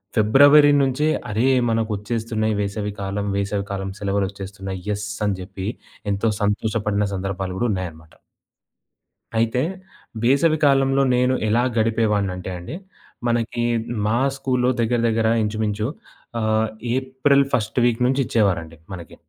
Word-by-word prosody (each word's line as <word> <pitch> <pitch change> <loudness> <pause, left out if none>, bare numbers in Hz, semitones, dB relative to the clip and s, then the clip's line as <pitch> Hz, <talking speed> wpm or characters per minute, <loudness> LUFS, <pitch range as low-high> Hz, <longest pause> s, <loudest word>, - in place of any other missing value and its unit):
ఫిబ్రవరి 145 +7 +6
నుంచి 135 +3 +1 0.2
అరే 110 +5 +1 0.2
మనకొచ్చేస్తున్నాయి 110 0 -1
వేసవి 105 +1 -3
కాలం, 100 +1 -3
వేసవి 100 0 -1
కాలం 95 0 -3
సెలవులు 100 -1 0
వచ్చేస్తున్నాయి. 95 -1 -7
యెస్! 105 0 -2 0.2
అని 100 -2 -1
చెప్పి, 95 +1 -6 0.4
ఎంతో 100 +3 +1
సంతోషపడిన 105 0 0
సందర్భాలు 95 -1 -3
కూడా 120 - +1
ఉన్నాయన్నమాట. 80 -4 -6 1.2
అయితే, 115 +2 +1 0.6
వేసవి 140 +6 +3
కాలంలో 135 -1 +3
నేను 125 +1 +2
ఎలా 115 +3 +2
గడిపేవాడినంటే 105 -5 0
అండి, 90 - -7 0.5
మనకీ 120 0 0 0.4
మా 115 +3 +2 0.2
స్కూల్‌లో 125 -2 +1
దగ్గర, 120 +1 +1
దగ్గర 110 0 +1 0.2
ఇంచుమించు 105 0 -1 0.5
ఆహ్, 110 0 +1 0.3
ఏప్రల్ 130 +2 +2
ఫస్ట్ 110 +2 -1
వీక్ 120 0 +1
నుంచిచ్చేవారండి 100 - 0 0.2
మనకి, 85 -4 -9
110 Hz, 115 wpm, -22 LUFS, 100-120 Hz, 1.2 s, ఫిబ్రవరి